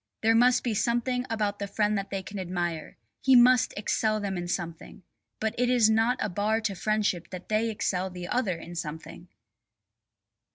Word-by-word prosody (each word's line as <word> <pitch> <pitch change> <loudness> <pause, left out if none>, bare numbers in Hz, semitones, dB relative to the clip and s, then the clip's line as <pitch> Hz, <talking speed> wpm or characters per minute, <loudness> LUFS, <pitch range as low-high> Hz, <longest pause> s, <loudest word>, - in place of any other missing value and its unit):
There 225 +1 +5
must 245 +2 +4
be 235 - -1
something 240 +3 0
about 210 -2 -1
the 200 - -3
friend 210 +1 0
that 195 -1 -3
they 195 -1 -4
can 195 +3 -7
admire; 175 -3 -4 0.2
he 265 -1 +5
must 250 0 +6
excel 215 +1 0
them 200 -2 -3
in 175 -1 -4
something. 170 +1 -5 0.4
But 220 0 -1
it 250 0 +2
is 235 -3 +4
not 225 +3 +2
a - - 0
bar 210 +3 0
to 215 -2 -1
friendship 205 -2 -1
that 185 -1 -9
they 215 +1 +1
excel 190 -3 -1
the 180 -1 -7
other 205 -7 0
in 170 +1 -10
something. 165 +2 -7
210 Hz, 180 wpm, -27 LUFS, 180-225 Hz, 0.4 s, must